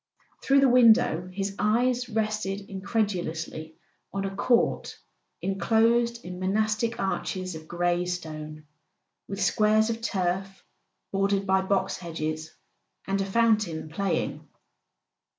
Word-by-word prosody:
Through 275 Hz, 0 st, +4 dB
the 275 Hz, -, +6 dB
window 225 Hz, -8 st, +5 dB
his 195 Hz, +1 st, -3 dB
eyes 245 Hz, +3 st, +1 dB
rested 215 Hz, -3 st, -1 dB
incredulously 185 Hz, -6 st, -3 dB, 0.4 s
on 195 Hz, 0 st, -2 dB
a 195 Hz, 0 st, -4 dB
court 230 Hz, +4 st, +1 dB, 0.5 s
enclosed 230 Hz, +4 st, +2 dB
in 180 Hz, 0 st, -7 dB
monastic 215 Hz, +4 st, 0 dB
arches 185 Hz, -1 st, -2 dB
of 160 Hz, 0 st, -9 dB
grey 175 Hz, +1 st, 0 dB
stone, 155 Hz, -3 st, -6 dB, 0.6 s
with 195 Hz, 0 st, -5 dB
squares 215 Hz, +3 st, +3 dB
of 230 Hz, 0 st, -5 dB
turf 195 Hz, -2 st, -2 dB, 0.5 s
bordered 195 Hz, 0 st, +1 dB
by 190 Hz, 0 st, +3 dB
box 190 Hz, 0 st, 0 dB
hedges, 155 Hz, -2 st, -4 dB, 0.6 s
and 195 Hz, 0 st, 0 dB
a -, -, -1 dB
fountain 210 Hz, -7 st, +1 dB
playing. 170 Hz, +1 st, -2 dB
195 Hz, 115 wpm, -27 LUFS, 180-220 Hz, 0.6 s, the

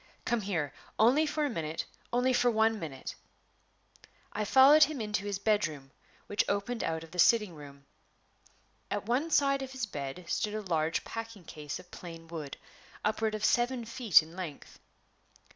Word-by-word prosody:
Come 240 Hz, -2 st, +1 dB
here 170 Hz, -8 st, -2 dB, 0.2 s
only 265 Hz, +8 st, +4 dB
for 300 Hz, 0 st, 0 dB
a -, -, 0 dB
minute 160 Hz, -5 st, -3 dB, 0.3 s
only 250 Hz, +2 st, +2 dB
for 245 Hz, 0 st, +3 dB
one 220 Hz, -1 st, +2 dB
minute!" 140 Hz, -6 st, -6 dB, 1.2 s
I 210 Hz, 0 st, -1 dB
followed 270 Hz, +7 st, +7 dB
him 305 Hz, -3 st, -5 dB
into 210 Hz, -2 st, -2 dB
his 200 Hz, -1 st, -2 dB
bedroom, 175 Hz, -10 st, 0 dB, 0.3 s
which 205 Hz, -, +1 dB
opened 205 Hz, +4 st, -1 dB
out 160 Hz, 0 st, -2 dB
of 165 Hz, -, -13 dB
the 180 Hz, -, -7 dB
sitting 210 Hz, 0 st, +4 dB
room. 140 Hz, -2 st, -12 dB, 1.0 s
At 205 Hz, -1 st, -3 dB
one 255 Hz, +8 st, 0 dB
side 275 Hz, -3 st, +3 dB
of 265 Hz, 0 st, -6 dB
his 260 Hz, -3 st, -2 dB
bed 145 Hz, -2 st, -6 dB
stood 210 Hz, +5 st, -1 dB
a 215 Hz, -, -2 dB
large 165 Hz, -4 st, 0 dB
packing 225 Hz, -4 st, -7 dB
case 150 Hz, -2 st, -6 dB
of 180 Hz, -1 st, -15 dB
plain 165 Hz, -2 st, -9 dB
wood, 160 Hz, -4 st, -6 dB, 0.5 s
upward 215 Hz, 0 st, 0 dB
of 215 Hz, 0 st, -1 dB
seven 240 Hz, 0 st, +1 dB
feet 225 Hz, -7 st, +4 dB
in 160 Hz, +2 st, -13 dB
length. 175 Hz, -6 st, -8 dB
210 Hz, 165 wpm, -30 LUFS, 165-240 Hz, 1.2 s, followed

